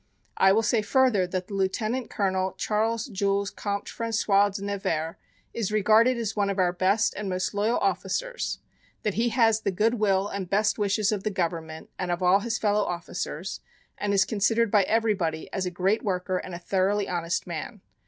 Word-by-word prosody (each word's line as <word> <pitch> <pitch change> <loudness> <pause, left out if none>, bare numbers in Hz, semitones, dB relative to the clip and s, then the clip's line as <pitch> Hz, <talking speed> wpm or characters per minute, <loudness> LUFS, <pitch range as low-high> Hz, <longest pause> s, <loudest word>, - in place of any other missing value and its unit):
I 190 - +5
will 220 +3 +3
say 225 0 +2
further 215 -4 +2
that 185 0 -3
the - - -9
Lieutenant 215 +5 -1
Colonel 190 -2 0
Charles 220 +3 -1
Jules 200 -3 -1
Comte 200 -1 -3
François 215 -3 +1
de 195 0 -6
Nevers, 185 -6 -2 0.4
is 220 -4 -2
regarded 220 +4 +4
as 220 -2 -3
one 200 -1 +1
of 200 - -2
our 180 -2 +2
best 190 +4 +2
and 205 -1 -4
most 185 +2 -2
loyal 210 +4 +1
officers, - - -2 0.5
that 210 - 0
he 230 +4 +1
has 225 -2 +3
the 200 - 0
good 220 +5 +1
will 195 -2 +2
and 195 -3 -5
best 210 +3 +1
wishes 205 +1 +1
of 210 -2 -1
the 215 - -1
government 165 -4 -4
and 180 - -2
of 175 +1 -1
all 180 +2 +5
his 235 +2 -2
fellow 210 -1 +1
officers, 175 -1 -4 0.4
and 205 - -2
is 195 -1 +4
considered 220 +2 +1
by 210 - +5
everybody 205 -8 0
as 190 -2 -1
a - - 0
great 185 +5 0
worker 185 -2 -1
and 180 - -7
a - - -4
thoroughly 195 +3 0
honest 170 -1 -2
man. 180 +5 -6
200 Hz, 190 wpm, -26 LUFS, 185-215 Hz, 0.5 s, I